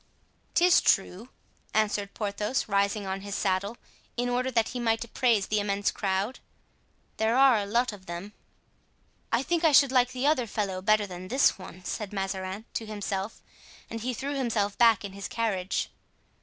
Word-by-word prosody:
"'Tis 350 +2 +6
true," 195 +4 +1 0.5
answered 205 -2 0
Porthos, 210 +3 -2
rising 200 0 +1
on 190 0 -3
his 200 0 -5
saddle, 200 +3 -1 0.4
in 245 +1 0
order 250 +1 0
that 230 -3 +1
he 250 - -5
might 225 -1 +1
appraise 235 -3 +1
the 215 - 0
immense 200 0 0
crowd, 195 +4 -1 0.8
"there 220 +2 +2
are 265 -4 +6
a 200 - -3
lot 235 +2 +1
of 190 -2 -13
them." 175 +5 -6 1.0
"I 235 +3 +2
think 340 +3 0
I 320 - +6
should 280 -2 +6
like 250 -1 +4
the 255 +1 -3
other 285 -5 +2
fellow 195 -3 -2
better 215 +2 +3
than 185 -1 -8
this 260 -1 +3
one," 185 0 -11
said 210 -2 -4
Mazarin 195 +1 -3
to 225 - -3
himself, 205 -1 -4 0.5
and 225 0 -4
he 250 +2 -2
threw 280 +5 -3
himself 225 -7 0
back 230 -4 +4
in 195 - -7
his 200 0 -6
carriage. 200 -5 -1
215 Hz, 170 wpm, -28 LUFS, 200-245 Hz, 1.0 s, Tis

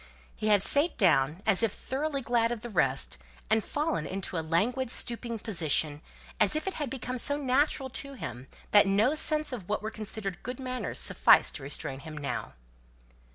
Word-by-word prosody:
He 215 - -3
had 205 -2 +5
sate 290 +5 +2
down, 160 - +3
as 215 -2 +4
if 225 -3 +3
thoroughly 280 +1 -3
glad 235 -1 +2
of 235 -3 -3
the 240 0 -7
rest, 135 - +1 0.3
and 220 -1 +3
fallen 295 - -1
into 190 +1 -4
a 165 - 0
languid 225 +11 0
stooping 235 -1 -3
position, 160 - -1 0.4
as 210 +3 +4
if 310 - -1
it 385 - -2
had 295 -4 -3
become 255 -1 -4
so 285 +4 0
natural 275 0 +1
to 275 0 -10
him 125 - -7 0.2
that 205 -1 +7
no 210 +8 +3
sense 305 -2 +2
of 205 -7 -7
what 210 - -1
were 220 - -3
considered 210 -3 -6
good 250 +2 -6
manners 255 -1 -3
sufficed - - +4
to - - -11
restrain 135 -1 -2
him 155 +1 -9
now. 145 -1 -4
220 Hz, 185 wpm, -29 LUFS, 175-260 Hz, 0.4 s, that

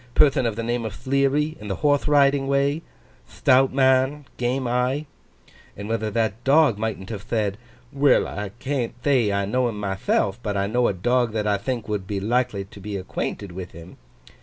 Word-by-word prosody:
Perthon 135 -4 +4
of 110 - -2
the 115 - -3
name 120 +1 -1
of 110 -3 -5
Thleary, 140 +3 +1
in 105 - -7
the 95 - -2
Horthe 145 -1 +1
Riding 140 -2 +3
way—thtout 140 -2 0
man—game 130 -1 +1
eye?" 125 +5 0 0.7
And 100 +1 -6
whether 110 -1 -1
that 110 +1 -1
dog 140 -6 +4
mightn't 110 -2 -4
have 105 -3 -5
thed, 105 -2 -1 0.4
"Well, 140 -1 +3
I 105 0 -5
can't 130 -2 -3
thay 130 -7 +3
I 100 0 0
know 125 +4 +1
him 105 -3 -6
mythelf, 95 +1 0
but 105 -3 -2
I 100 - +1
know 120 +4 +1
a - - 0
dog 120 +4 +1
that 110 -1 -1
I 100 -1 +1
think 120 +1 -3
would 105 -3 -3
be 100 -1 -2
likely 115 -1 0
to 100 - -14
be 100 0 -5
acquainted 95 +1 -4
with 90 0 -8
him." 85 +2 -12
120 Hz, 185 wpm, -23 LUFS, 105-135 Hz, 0.7 s, Perthon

